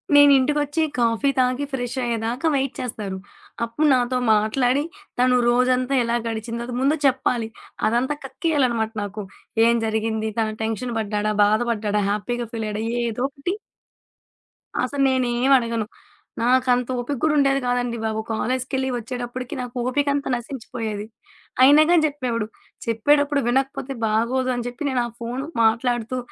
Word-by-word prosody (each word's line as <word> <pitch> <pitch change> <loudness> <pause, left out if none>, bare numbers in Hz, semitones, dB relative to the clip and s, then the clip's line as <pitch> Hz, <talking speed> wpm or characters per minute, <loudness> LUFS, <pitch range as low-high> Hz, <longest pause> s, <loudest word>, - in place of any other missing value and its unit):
నేనింటికొచ్చి 290 +2 +5 0.2
coffee 235 +4 +2
తాగి 255 +2 +1
ఫ్రెష్షయ్యేదాకా 245 +1 -2
wait 270 -1 0
చేస్తారు. 210 -6 -4 0.5
అప్పుడు 295 +7 0
నాతో 250 0 +1 0.2
మాట్లాడి 245 +6 +2 0.4
తను 250 0 +4
రోజంతా 250 +2 +2
ఎలా 235 0 0
గడిచిందో 230 +1 -4 0.2
ముందు 285 +3 +3
చెప్పాలి. 250 -3 +1 0.4
అదంతా 245 +6 +1
కక్కేయాలనమాట 255 -7 0
నాకు. 205 +1 -5 0.4
ఏం 235 0 +4
జరిగింది? 220 0 -1
తను 220 -1 0
టెన్షన్ 225 +2 -3
పడ్డాడా? 210 0 -1
బాధపడ్డాడా? 215 -1 +1
హ్యాపీగా 235 +3 -2
ఫీలయ్యాడా 215 -1 -3 0.2
ఏదోకటి. 270 - -2 1.3
అసలు 275 +2 -1
నేనేమడగను. 240 -2 +2 0.6
నాకంత 250 0 +3
ఓపిక 265 +4 -2
గూడా 315 -1 +3
ఉండేది 275 -1 +3
కాదండి 245 -1 0
బాబు! 220 0 -1
కాలేజికెళ్ళి 260 +3 -1
ఒచ్చేటప్పటికి 245 +1 -5
నాకు 245 0 -7
ఓపికంత 285 +1 0
నశించిపోయేది. 225 -4 -5 0.6
అయినాగాని 310 +5 +6
జెప్పేవాడు. 250 -7 -2 0.4
చెప్పేటప్పుడు 285 +5 +2
వినకపోతే 270 +1 0
బాగోదు 245 +4 +1
అని 240 - -3
జెప్పి 280 +4 -4
నేను 255 -2 +1
ఆ - - -3
ఫోను 245 +4 -4 0.2
మాట్లాడుతూ 240 +2 +1
245 Hz, 115 wpm, -23 LUFS, 225-270 Hz, 1.3 s, అయినాగాని